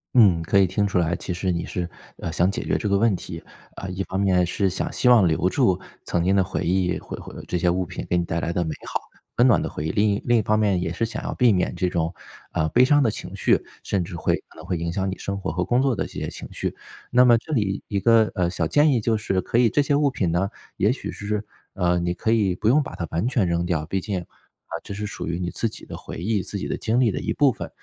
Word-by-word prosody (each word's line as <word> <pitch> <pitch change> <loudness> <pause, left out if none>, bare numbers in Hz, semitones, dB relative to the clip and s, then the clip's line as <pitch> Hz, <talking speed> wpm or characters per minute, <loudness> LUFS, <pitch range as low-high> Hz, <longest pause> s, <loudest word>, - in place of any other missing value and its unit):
嗯， 100 -9 +6
可 80 +4 +1
以 100 - +6
听 100 +3 0
出 95 - -1
来， 90 0 +2
其 90 - -4
实 90 +1 -1
你 85 -1 -2
是， 90 -1 -3 0.3
呃， 80 - -4
想 90 +4 +2
解 - - -3
决 - - 0
这 105 - -2
个 100 - +3
问 115 +1 +3
题。 85 -2 -7 0.3
啊， 95 - -6
一 90 +2 -3
方 95 - -3
面 95 -2 +3
是 95 +2 0
想 90 - -3
希 125 - +2
望 115 -7 +7
留 85 +3 +2
住 95 -9 +2 0.3
曾 85 -1 0
经 95 +2 +3
的 95 - +4
回 - - -3
忆， 90 0 +1
回 - - -8
回 - - -10
这 90 - -2
些 90 +1 +2
物 90 +1 0
品 90 +1 -6
给 90 - +2
你 85 - +1
带 85 0 -2
来 85 - -2
的 90 - +1
美 80 -2 -3
好、 - - -1 0.4
温 120 - +5
暖 120 - +4
的 - - -3
回 75 - -5
忆， - - 0
另 105 +1 +2
一 100 0 0
另 120 -1 +4
一 - - +3
方 110 +1 +1
面 100 -4 +2
也 85 - -2
是 115 - 0
想 115 - -5
要 - - -2
避 125 -3 +5
免 90 -3 0
这 90 - 0
种， 85 -1 -1 0.4
呃， 80 0 +1
悲 120 +10 +5
伤 145 +1 +4
的 115 - +2
情 - - -7
绪， - - +3 0.2
甚 95 -3 0
至 85 +1 -7
会 85 - 0
可 - - -21
能 - - -10
会 90 - -1
影 85 +1 -2
响 95 +2 -1
你 - - -6
生 100 0 -4
活 95 - -3
和 90 +3 -1
工 120 +6 +2
作 135 -3 +2
的 - - -2
这 - - -15
些 - - -4
情 - - -8
绪。 - - -3 0.4
那 125 +1 +6
么 120 -2 +6
这 135 - -9
里 105 -6 0
一 100 - -1
个， 115 +1 +4
呃， 90 -4 +1
小 90 -2 -1
建 145 - +4
议 120 - +1
就 110 0 +1
是 95 -4 -1
可 115 - -1
以 120 -1 +5
这 145 - +2
些 140 - 0
物 145 0 +3
品 95 -10 -1
呢， 95 +4 +1 0.3
也 - - +3
许 - - -4
是， 105 +1 -3 0.3
呃， 90 0 +1
你 85 0 -1
可 110 +5 -1
以 100 -5 +2
不 105 - +1
用 150 +5 +5
把 - - -6
它 85 - -3
完 85 +8 0
全 120 -6 +2
扔 85 0 0
掉， 80 -3 -1
毕 95 +4 -1
竟， 95 -1 -3
啊， - - -18
这 100 - -7
是 105 +1 -4
属 105 - -5
于 85 +1 -1
你 90 -1 -2
自 115 - 0
己 - - -11
的 - - -8
回 - - -8
忆、 100 +4 0
自 - - -4
己 - - -4
的 - - -2
经 115 +3 0
历 115 -5 +3
的 - - -3
一 - - -2
部 145 -3 +4
分。 - - -7
95 Hz, 315 characters per minute, -24 LUFS, 90-110 Hz, 0.4 s, 望